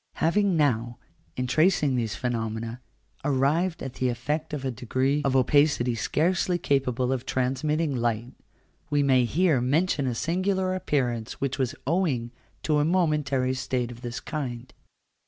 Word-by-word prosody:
Having 190 Hz, +2 st, +2 dB
now, 120 Hz, -5 st, +1 dB, 0.4 s
in 125 Hz, -, -1 dB
tracing 150 Hz, 0 st, +3 dB
these 115 Hz, -5 st, -1 dB
phenomena, 115 Hz, 0 st, -3 dB, 0.4 s
arrived 150 Hz, +6 st, +1 dB
at 135 Hz, -, -5 dB
the 130 Hz, -, +3 dB
effect 145 Hz, +6 st, -2 dB
of 145 Hz, -3 st, -4 dB
a 130 Hz, -, 0 dB
degree 130 Hz, +5 st, 0 dB
of 135 Hz, -2 st, +1 dB
opacity 130 Hz, -2 st, +3 dB
scarcely 175 Hz, -, +1 dB
capable 130 Hz, -4 st, 0 dB
of 130 Hz, -2 st, -3 dB
transmitting 145 Hz, +4 st, 0 dB
light, 120 Hz, 0 st, -1 dB, 0.6 s
we 145 Hz, -1 st, +2 dB
may 130 Hz, -3 st, +4 dB
here 155 Hz, -1 st, +2 dB
mention 140 Hz, +2 st, +1 dB
a 125 Hz, -, -1 dB
singular 185 Hz, +5 st, 0 dB
appearance 125 Hz, -10 st, -1 dB
which 140 Hz, 0 st, -3 dB
was 130 Hz, -2 st, 0 dB
owing 140 Hz, -7 st, 0 dB, 0.3 s
to 150 Hz, -2 st, +2 dB
a -, -, +3 dB
momentary 150 Hz, -6 st, +1 dB
state 125 Hz, -2 st, -2 dB
of 120 Hz, 0 st, -11 dB
this 120 Hz, -1 st, -5 dB
kind. 130 Hz, -5 st, -5 dB
135 Hz, 145 wpm, -26 LUFS, 125-155 Hz, 0.6 s, may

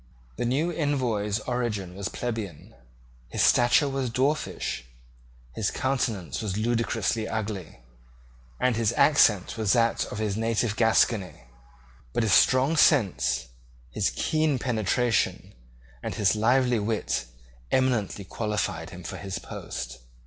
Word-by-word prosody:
The -, -, -1 dB
new 145 Hz, +8 st, +1 dB
Envoy's 125 Hz, -10 st, 0 dB
origin 110 Hz, -8 st, -2 dB
was 100 Hz, +1 st, -4 dB
plebeian, 110 Hz, -9 st, -5 dB, 0.5 s
his -, -, 0 dB
stature 120 Hz, +4 st, +4 dB
was 135 Hz, -2 st, -2 dB
dwarfish, 130 Hz, -, -1 dB, 0.7 s
his 110 Hz, -, -1 dB
countenance 125 Hz, -, -2 dB
was 100 Hz, -3 st, -3 dB
ludicrously 115 Hz, -1 st, 0 dB
ugly, 105 Hz, -, -5 dB, 0.8 s
and 125 Hz, -2 st, +2 dB
his 115 Hz, 0 st, +1 dB
accent 120 Hz, -8 st, +4 dB
was 105 Hz, -3 st, +2 dB
that 115 Hz, -1 st, +2 dB
of -, -, -7 dB
his 105 Hz, -2 st, -1 dB
native 115 Hz, 0 st, 0 dB
Gascony: 110 Hz, -, +2 dB, 0.7 s
but -, -, +1 dB
his 105 Hz, -5 st, +2 dB
strong 130 Hz, -, +4 dB
sense, 85 Hz, -, +3 dB, 0.4 s
his -, -, 0 dB
keen 155 Hz, -, +1 dB
penetration, 120 Hz, -1 st, 0 dB, 0.5 s
and -, -, -4 dB
his 105 Hz, 0 st, +2 dB
lively 125 Hz, +2 st, +3 dB
wit 105 Hz, -, -1 dB, 0.5 s
eminently 115 Hz, -7 st, +1 dB
qualified 105 Hz, -7 st, -3 dB
him 90 Hz, +1 st, -10 dB
for -, -, -6 dB
his 95 Hz, -2 st, -5 dB
post. 65 Hz, 0 st, -7 dB
115 Hz, 120 wpm, -26 LUFS, 100-125 Hz, 0.8 s, stature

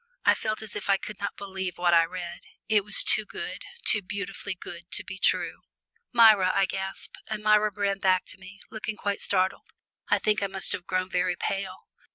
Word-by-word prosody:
I -, -, +7 dB
felt 215 Hz, 0 st, -3 dB
as 215 Hz, -, -6 dB
if -, -, -5 dB
I 195 Hz, -, +5 dB
could 210 Hz, +1 st, -8 dB
not 200 Hz, -, -4 dB
believe 190 Hz, -3 st, -5 dB
what 175 Hz, -1 st, +2 dB
I 165 Hz, -1 st, +6 dB
read. 175 Hz, 0 st, -7 dB, 0.3 s
It 210 Hz, -2 st, +3 dB
was 210 Hz, 0 st, +5 dB
too 215 Hz, -, +5 dB
good, -, -, -7 dB, 0.2 s
too 210 Hz, -, +5 dB
beautifully 200 Hz, 0 st, -5 dB
good 175 Hz, -1 st, -10 dB
to -, -, +1 dB
be 190 Hz, -, -8 dB
true. -, -, 0 dB, 0.5 s
"Myra," 220 Hz, -6 st, +6 dB
I 195 Hz, -, +4 dB
gasped, 190 Hz, 0 st, -6 dB
and 215 Hz, -1 st, -4 dB
Myra 215 Hz, 0 st, +4 dB
ran 200 Hz, 0 st, -1 dB
back 185 Hz, -1 st, +2 dB
to -, -, -8 dB
me, 190 Hz, +2 st, -13 dB
looking 220 Hz, 0 st, -5 dB
quite 200 Hz, -1 st, -2 dB
startled. 185 Hz, -1 st, 0 dB, 0.4 s
I -, -, +4 dB
think 210 Hz, -1 st, +1 dB
I 200 Hz, -, +1 dB
must 190 Hz, 0 st, 0 dB
have 175 Hz, -, -4 dB
grown 185 Hz, -1 st, 0 dB
very 180 Hz, 0 st, +1 dB
pale. 190 Hz, +1 st, -4 dB
195 Hz, 205 wpm, -27 LUFS, 185-210 Hz, 0.5 s, I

